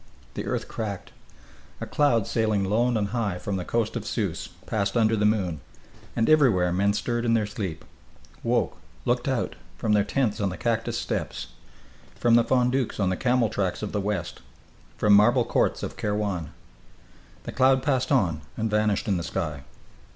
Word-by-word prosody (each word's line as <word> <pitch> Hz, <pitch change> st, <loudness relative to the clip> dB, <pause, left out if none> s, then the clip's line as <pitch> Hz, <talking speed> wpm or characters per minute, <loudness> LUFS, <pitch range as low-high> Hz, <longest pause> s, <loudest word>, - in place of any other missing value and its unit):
The -, -, -5 dB
earth -, -, -2 dB
cracked. 105 Hz, -4 st, -5 dB, 0.7 s
A -, -, -4 dB
cloud 120 Hz, -8 st, +2 dB
sailing 110 Hz, -3 st, +1 dB
lone 115 Hz, +5 st, +2 dB
and 100 Hz, -2 st, -1 dB
high 105 Hz, -5 st, -1 dB
from 95 Hz, +2 st, -3 dB
the 90 Hz, -, -3 dB
coast 115 Hz, +4 st, -1 dB
of 115 Hz, -, -3 dB
Sousse 105 Hz, -6 st, -2 dB, 0.2 s
passed 100 Hz, +1 st, -1 dB
under 110 Hz, -1 st, +3 dB
the 105 Hz, -1 st, +3 dB
moon 95 Hz, -7 st, 0 dB, 0.5 s
and 115 Hz, -, +1 dB
everywhere 110 Hz, -, +4 dB
men 100 Hz, +2 st, +2 dB
stirred 120 Hz, +2 st, -1 dB
in 115 Hz, -1 st, +2 dB
their 110 Hz, -2 st, +2 dB
sleep, 100 Hz, -5 st, -5 dB, 0.6 s
woke, 115 Hz, -4 st, 0 dB, 0.3 s
looked -, -, 0 dB
out -, -, -1 dB, 0.2 s
from 110 Hz, -, 0 dB
their 105 Hz, -1 st, +4 dB
tents 110 Hz, 0 st, 0 dB
on 100 Hz, -, +1 dB
the 90 Hz, -, -6 dB
cactus 115 Hz, +1 st, -1 dB
steppes, -, -, -3 dB, 0.7 s
from 120 Hz, -1 st, +2 dB
fondouks 125 Hz, 0 st, +1 dB
on 95 Hz, -2 st, +2 dB
the -, -, 0 dB
camel 125 Hz, +1 st, +2 dB
tracks 100 Hz, -3 st, -2 dB
of 105 Hz, -, -3 dB
the 105 Hz, -, -1 dB
west, 95 Hz, -4 st, -3 dB, 0.6 s
from 105 Hz, -1 st, +4 dB
marble 120 Hz, +4 st, +5 dB
courts -, -, +1 dB
of -, -, -5 dB
Kairwan.... 105 Hz, -6 st, -2 dB, 0.9 s
The -, -, -6 dB
cloud 130 Hz, 0 st, +3 dB
passed 130 Hz, -2 st, 0 dB
on 90 Hz, -, +2 dB, 0.2 s
and 110 Hz, 0 st, -1 dB
vanished 105 Hz, -1 st, +1 dB
in 100 Hz, -3 st, +2 dB
the 85 Hz, -, -3 dB
sky. 80 Hz, -5 st, -3 dB
105 Hz, 175 wpm, -26 LUFS, 100-120 Hz, 0.9 s, marble